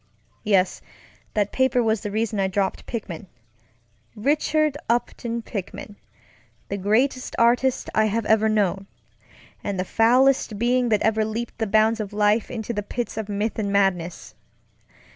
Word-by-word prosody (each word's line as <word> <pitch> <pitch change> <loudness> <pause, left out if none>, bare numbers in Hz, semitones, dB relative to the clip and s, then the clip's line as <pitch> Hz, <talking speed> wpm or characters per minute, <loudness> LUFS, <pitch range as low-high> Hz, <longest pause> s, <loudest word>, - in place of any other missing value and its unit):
Yes, 190 -3 +2 0.5
that 205 -1 +1
paper 260 -2 +2
was 220 -2 +1
the 210 - -4
reason 215 0 -1
I 195 - +2
dropped 190 0 -2
Pickman; 195 -6 -6 0.9
Richard 300 +5 +1
Upton 235 0 -1
Pickman, 205 0 -6 0.7
the 200 - -2
greatest 245 +7 0
artist 245 +2 +2
I 215 - +3
have 220 +1 -1
ever 220 0 +3
knownŌĆöand 195 -2 0 0.9
the 185 - -1
foulest 245 +1 +3
being 245 +2 +2
that 215 -2 +2
ever 220 0 +2
leaped 225 +2 -4
the 220 - 0
bounds 220 +2 +3
of 210 -1 -5
life 210 +1 +2
into 235 -1 -4
the 205 - -2
pits 240 +3 -4
of 215 -1 -4
myth 210 +2 -2
and 200 -2 -1
madness. 185 -4 0
220 Hz, 145 wpm, -23 LUFS, 205-235 Hz, 0.9 s, I